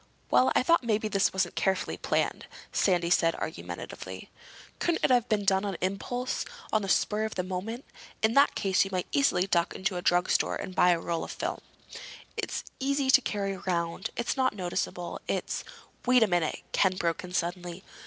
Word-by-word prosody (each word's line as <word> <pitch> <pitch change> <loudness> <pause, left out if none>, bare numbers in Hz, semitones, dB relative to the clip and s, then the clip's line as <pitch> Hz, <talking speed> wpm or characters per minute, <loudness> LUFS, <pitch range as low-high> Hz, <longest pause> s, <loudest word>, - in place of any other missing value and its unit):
"Well, 125 +1 +5
I - - +4
thought 335 +1 +4
maybe 220 -2 +1
this 200 -2 +2
wasn't 190 -2 0
carefully 190 -1 0
planned," - - -1 0.2
Sandy 175 -3 +2
said 165 -2 +4
argumentatively. 95 - -7 0.5
"Couldn't 340 -1 0
it - - +2
have 245 -1 +3
been 210 -2 +1
done 190 0 +3
on 200 -4 -3
impulse—on 245 - -2
the 195 - -4
spur 210 +2 +2
of 220 - -3
the 180 - -1
moment? 195 +7 -5 0.4
In 220 +1 +4
that 280 +2 +5
case 190 -1 +2
you 195 - -5
might 185 -1 -1
easily 275 -10 +3
duck 170 -3 +1
into 190 -1 -1
a - - -3
drugstore 175 0 +2
and 185 - -5
buy 180 - +4
a 175 -1 +3
roll 165 0 -2
of - - -7
film. - - -3 0.7
It's - - -3 0.2
easy 275 0 +1
to 265 - +7
carry 200 -4 -2
around. 175 -2 -2
It's 235 - -1
not 255 -4 +1
noticeable. 175 -1 -3
It's—" - - -2 0.4
"Wait 250 -2 +6
a - - +3
minute!" 175 -4 0
Ken 190 -2 +3
broke 170 -2 -1
in 180 - -8
suddenly. 175 +1 -3
190 Hz, 185 wpm, -28 LUFS, 175-220 Hz, 0.7 s, to